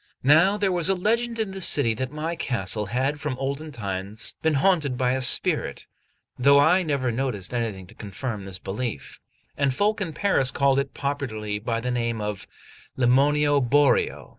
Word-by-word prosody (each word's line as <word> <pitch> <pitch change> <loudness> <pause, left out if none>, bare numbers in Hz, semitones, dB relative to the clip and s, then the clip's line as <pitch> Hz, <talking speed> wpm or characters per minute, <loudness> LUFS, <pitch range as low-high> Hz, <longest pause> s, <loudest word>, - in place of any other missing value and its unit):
Now 165 +9 +5
there 200 -2 +1
was 175 0 +1
a 195 - +3
legend 230 +5 -1
in 215 -3 -1
the 190 0 -7
city 140 -9 +2
that 130 +4 -4
my 155 +3 -4
castle 105 - -1
had 130 +7 -1
from 140 -3 -3
olden 140 +4 -4
times 100 -2 -3
been 160 -2 +1
haunted 145 -4 +1
by 125 -1 +1
a 130 +1 -1
spirit, 125 - +1 0.5
though 140 +3 +5
I 175 +6 +4
never 140 -7 -1
noticed 120 -5 -3
anything 110 -6 -3
to 95 - -17
confirm 105 0 -6
this 95 -2 -6
belief; 100 - -5 0.4
and 140 -1 +1
folk 210 +4 0
in 170 -5 -3
Paris 150 -8 +2
called 140 +1 +2
it 140 0 -4
popularly 110 -7 -3
by 115 +2 -2
the 125 +2 -3
name 115 -2 -1
of 105 -2 -5 0.5
Lemmonio 145 +3 +3
Boreò. 140 +2 +2
135 Hz, 175 wpm, -24 LUFS, 115-150 Hz, 0.5 s, Now